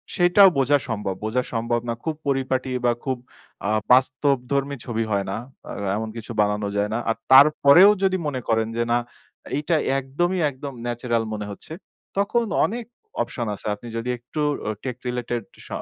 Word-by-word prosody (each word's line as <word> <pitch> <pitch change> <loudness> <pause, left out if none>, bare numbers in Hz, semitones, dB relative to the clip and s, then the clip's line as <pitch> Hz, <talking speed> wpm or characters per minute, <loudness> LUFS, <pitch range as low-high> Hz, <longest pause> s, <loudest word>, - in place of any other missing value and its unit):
সেটাও 180 +2 +7
বোঝা 140 +2 +4
সম্ভব। 105 -4 -2
বোঝা 125 +4 0
সম্ভব 115 +1 0
না, - - +1
খুব 160 -1 -2
পরিপাটি 130 -1 0 0.2
বা 120 - +5
খুব 130 -2 -1 0.5
আ - - +1 0.2
বাস্তবধর্মী 135 +1 +2
ছবি 115 -2 -1
হয় 100 -1 +1
না। - - -2 0.3
আ - - -5 0.2
এমন 110 +1 -3
কিছু 115 0 -7
বানানো 105 0 0
যায় 100 0 +1
না। - - 0
আর 115 - +2 0.2
তারপরেও 145 +7 +8
যদি 190 -1 +3
মনে 130 -3 -3
করেন 110 -1 +2
যে, 120 - +2
"না, 120 - +4 0.6
এইটা 150 +3 0 0.2
একদমই 175 +8 -1
একদম, 140 0 -7
ন্যাচারাল 120 -1 -1
মনে 105 -1 -4
হচ্ছে," 100 - -10 0.4
তখন 220 +4 +1 0.2
অনেক 235 +2 -4 0.4
অপশন 120 -2 -3
আছে। 100 - -9
আপনি 110 +4 -12
যদি 115 +2 -3
একটু 125 +6 -8 0.3
ও - - 0
টেক 125 -3 -4
রিলেটেড 120 -1 -2 0.2
স - - -13
130 Hz, 170 wpm, -23 LUFS, 115-145 Hz, 0.6 s, তারপরেও